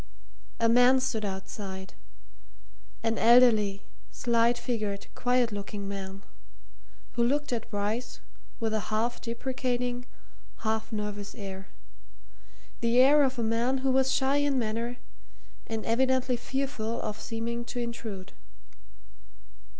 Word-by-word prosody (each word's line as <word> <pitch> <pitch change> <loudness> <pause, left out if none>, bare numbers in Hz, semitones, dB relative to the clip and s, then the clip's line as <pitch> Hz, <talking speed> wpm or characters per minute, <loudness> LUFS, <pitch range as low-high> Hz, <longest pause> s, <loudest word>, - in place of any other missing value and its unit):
A 230 - +4
man 245 +3 +6
stood 230 -4 -1
outside 190 -1 -5 1.1
an 225 -1 +1
elderly, 220 -4 +5 0.3
slight 235 0 +2
figured, 220 -5 -2
quiet 245 -1 +2
looking 205 0 -5
man, 195 0 -6 0.9
who 235 - +1
looked 285 +2 +1
at 230 -2 -3
Bryce 215 - -2 0.4
with 220 -1 -1
a 220 - +2
half 225 +3 0
deprecating, 245 0 -2 0.5
half 220 0 -1
nervous 210 -1 -4
air; 195 -1 -7 1.1
the 235 +1 +2
air 280 +4 +7
of 265 -2 +2
a 235 - 0
man 230 +4 +1
who 265 - +4
was 265 0 +3
shy 270 +1 +2
in 285 -1 +2
manner 230 +1 -2 0.7
and 225 -1 -3
evidently 260 +1 +2
fearful 240 -2 -2
of 215 0 -4
seeming 235 +1 -3
to 245 - -7
intrude. 225 -5 -5
230 Hz, 120 wpm, -29 LUFS, 215-250 Hz, 1.1 s, air